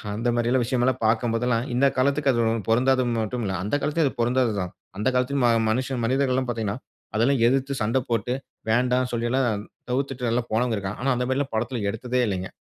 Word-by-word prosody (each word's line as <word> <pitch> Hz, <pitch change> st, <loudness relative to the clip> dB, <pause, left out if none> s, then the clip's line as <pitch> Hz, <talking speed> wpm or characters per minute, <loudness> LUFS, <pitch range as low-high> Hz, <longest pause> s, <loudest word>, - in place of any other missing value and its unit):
அந்த 115 Hz, +3 st, -1 dB
மாரி 120 Hz, 0 st, +1 dB
எல்லாம் 130 Hz, 0 st, +2 dB
விஷயம் 120 Hz, +1 st, 0 dB
எல்லாம் 130 Hz, -, +1 dB
பார்க்கும் 115 Hz, +1 st, +2 dB
போதெல்லாம் 120 Hz, +1 st, 0 dB
இந்த 125 Hz, +3 st, +3 dB
காலத்துக்கு 140 Hz, +2 st, +2 dB
அது 120 Hz, -2 st, +1 dB
ஒ -, -, +2 dB, 0.2 s
பொருந்தாது 130 Hz, +3 st, +3 dB, 0.2 s
மட்டுமில்ல. 110 Hz, -3 st, -2 dB
அந்த 105 Hz, +8 st, -1 dB
காலத்திலயும் 150 Hz, +1 st, +1 dB
அது 130 Hz, -, -6 dB
பொருந்தாது 120 Hz, 0 st, +2 dB
தான். 90 Hz, -1 st, -3 dB, 0.3 s
அந்த 105 Hz, -, -1 dB
காலத்திலும் 125 Hz, +1 st, +1 dB
ம 120 Hz, -, +5 dB, 0.2 s
மனிஷன் 130 Hz, +2 st, -1 dB
மனிதர்கள்லாம் 130 Hz, +1 st, +1 dB
பார்த்தீங்கன்னா, 110 Hz, -3 st, -2 dB, 0.4 s
அதெல்லாம் 125 Hz, +3 st, +2 dB
எதிர்த்து 135 Hz, +2 st, 0 dB
சண்ட 110 Hz, +4 st, +1 dB
போட்டு, 120 Hz, +2 st, 0 dB, 0.4 s
"வேண்டா" 125 Hz, +2 st, +3 dB
சொல்லி 120 Hz, 0 st, -1 dB
எல்லாம் 120 Hz, -6 st, +1 dB, 0.3 s
தவிர்த்துட்டெல்லாம் 125 Hz, -3 st, -1 dB
போனவன் 115 Hz, +1 st, +1 dB
இருக்கான். 95 Hz, 0 st, -5 dB
ஆனா, 135 Hz, -, +1 dB
அந்த 125 Hz, 0 st, -1 dB
மாரி 130 Hz, -, +1 dB
எல்லாம் 140 Hz, -3 st, -3 dB
படத்துல 115 Hz, 0 st, -2 dB
எடுத்ததே 125 Hz, +3 st, -1 dB
இல்லைங்க. 95 Hz, -2 st, -3 dB
125 Hz, 195 wpm, -24 LUFS, 115-130 Hz, 0.4 s, ம